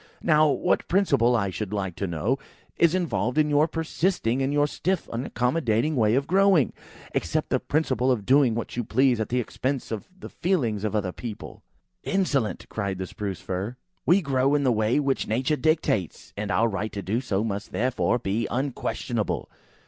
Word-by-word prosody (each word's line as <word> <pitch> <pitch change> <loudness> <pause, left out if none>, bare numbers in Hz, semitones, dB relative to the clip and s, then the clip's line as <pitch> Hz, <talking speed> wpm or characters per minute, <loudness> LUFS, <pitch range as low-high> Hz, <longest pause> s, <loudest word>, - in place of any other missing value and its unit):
Now 155 -1 +5
what 145 +6 +1
principle, 140 - +3
I 100 -4 0
should 105 +1 -4
like 95 -4 -2
to 100 - -2
know, 100 - -1 0.4
is 170 +1 +4
involved 125 - -1
in 150 -1 +3
your 145 +2 +4
persisting 160 -5 0
in 135 +1 0
your 145 0 +3
stiff 185 +5 -2
unaccommodating 125 +2 0
way 110 -2 +3
of 140 +1 +1
growing, 190 -5 +4 0.4
except - - -1
the - - +3
principle 130 -4 +1
of 110 -6 -1
doing 130 -3 +4
what 115 - -4
you 120 - -1
please 125 +2 +2
at 110 - -2
the 125 - +1
expense 130 +3 -3
of 110 -3 -4
the - - -8
feelngs 125 - 0
of 110 0 -1
other 100 -3 0
people?" 110 +2 -8 0.4
"Insolent!" 150 - 0
cried 100 -3 -3
the 95 - -3
Spruce 100 0 -5
fir; 95 +6 -4 0.3
"we 185 +2 +4
grow 135 0 +2
in 145 - +1
the 130 - +3
way 110 +4 +2
which 140 -2 0
Nature 130 +7 +1
dictates; 150 - 0
and 105 0 -4
our 100 +5 +3
right 105 0 -3
to 100 - -4
do 110 +6 -1
so 105 -5 -1
must 100 -2 -4
therefore 125 0 +1
be 110 0 -1
unquestionable. 120 -3 -2
125 Hz, 180 wpm, -25 LUFS, 105-145 Hz, 0.4 s, Now